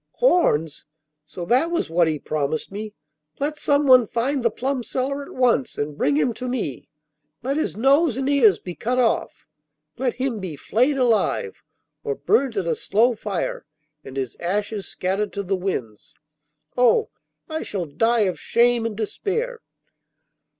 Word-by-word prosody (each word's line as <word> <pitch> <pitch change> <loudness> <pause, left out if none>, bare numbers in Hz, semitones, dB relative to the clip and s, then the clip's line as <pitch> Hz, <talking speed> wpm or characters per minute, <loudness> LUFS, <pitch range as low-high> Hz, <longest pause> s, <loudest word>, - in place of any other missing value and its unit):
'Horns! 165 - +2 0.4
so 170 +3 -7
that 255 - +3
was 345 - -1
what 165 +1 +2
he 155 -1 0
promised 155 +2 -2
me! 210 +1 -6 0.4
Let 300 +2 -2
someone 270 -6 +5
find 260 +5 -1
the 230 - +4
plum 260 +3 -2
seller 265 +4 -2
at 280 - -9
once 250 0 +1
and 145 0 -3
bring 145 0 +1
him 190 +11 +2
to 250 +3 -6
me! 225 - -3 0.5
Let 270 +3 -1
his 310 - -2
nose 275 +2 +3
and 270 0 -1
ears 250 -10 +5
be 180 - -8
cut 245 +8 -2
off! 245 -3 0 0.5
Let 255 -2 0
him 255 -4 -2
be 185 -6 -5
flayed 255 - +1
alive, 250 - +1 0.4
or 445 -1 -2
burnt 275 - +1
at 190 - 0
a 165 - +1
slow 225 +9 +2
fire 205 -5 -3 0.4
and 135 - -9
his 130 -3 -3
ashes 205 +3 -2
scattered 195 +3 -2
to 200 - -3
the 195 +1 0
winds! 130 - -5 0.6
Oh, 250 - +3 0.4
I 315 0 -3
shall 190 -4 -3
die 225 +11 +1
of 185 -4 0
shame 235 -1 +2
and 215 -2 -6
despair! 455 - -2
230 Hz, 160 wpm, -23 LUFS, 185-270 Hz, 0.6 s, someone